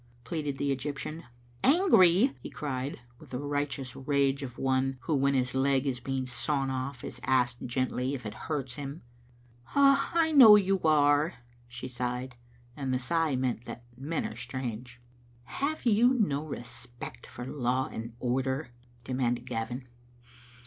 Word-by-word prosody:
pleaded 145 +2 -3
the 140 -1 0
Egyp 145 +2 -4
tian. 155 +4 -6 0.4
"Angry!" 265 - +5
he - - -7
cried, 135 -2 -4 0.2
with - - -15
the 125 - -4
righteous 145 -2 -3
rage 140 0 +1
of 125 -3 -7
one 130 0 +1
who 160 - -1
when 140 0 +2
his 125 -1 +1
leg 135 0 +2
is 130 -3 -1
being 130 +1 -2
sawn 135 +2 -1
off 130 -1 -4
is 125 - -7
asked 125 -2 +1
gently 130 +2 -1
if 125 -4 -8
it 105 - -4 0.2
hurts 135 -5 -2
him. 145 +2 -6 0.7
"I 280 +4 +4
know 225 -7 +11
you 195 -1 +3
are," 150 +1 +4 0.3
she 120 +1 -7
sighed, 125 0 -4 0.4
and 135 -2 -3
the 130 - +2
sigh 155 +3 0
meant 125 -2 -1
that 120 - -8
men 145 +6 -3
are - - -5
strange. 120 0 -6 0.3
" 120 0 -29 0.2
Have 300 +1 -1
you 240 +3 +5
no 150 - +1
respect 120 - -8
for 120 - -8
law 130 -1 0
and 115 +1 -6
order?" 130 +2 -1 0.3
demanded 125 -1 -1
Gavin. 120 +1 -4
135 Hz, 155 wpm, -29 LUFS, 125-150 Hz, 0.7 s, know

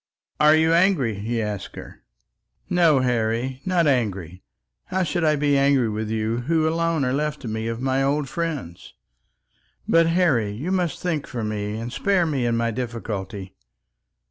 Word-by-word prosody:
"Are 150 +1 +6
you 160 +1 +3
angry?" 170 - +3
he 115 +2 -2
asked 105 -2 -5
her. - - -11 0.7
"No, 165 -6 +4
Harry; 120 +1 -1
not 180 -2 +2
angry. 100 - -1 0.4
How 190 0 -1
should 175 +1 -1
I 155 -1 +3
be 145 -1 +1
angry 140 -4 +3
with 110 0 -3
you 110 +1 -1
who 160 +5 +1
alone 165 -2 0
are 125 - 0
left 150 +1 -1
to 125 - -7
me 110 +1 -3
of 115 0 -3
my 135 0 +1
old 140 +1 0
friends? 145 - -5 0.9
But, 165 0 +4
Harry, 165 - +2
you 145 - -4
must 180 -5 -1
think 165 -5 -2
for 120 -3 -4
me, 105 0 -3
and 120 +2 -6
spare 195 +1 +1
me 135 -6 -1
in 115 -1 +1
my 115 0 0
difficulty." 105 -5 -5
130 Hz, 170 wpm, -23 LUFS, 110-160 Hz, 0.9 s, Are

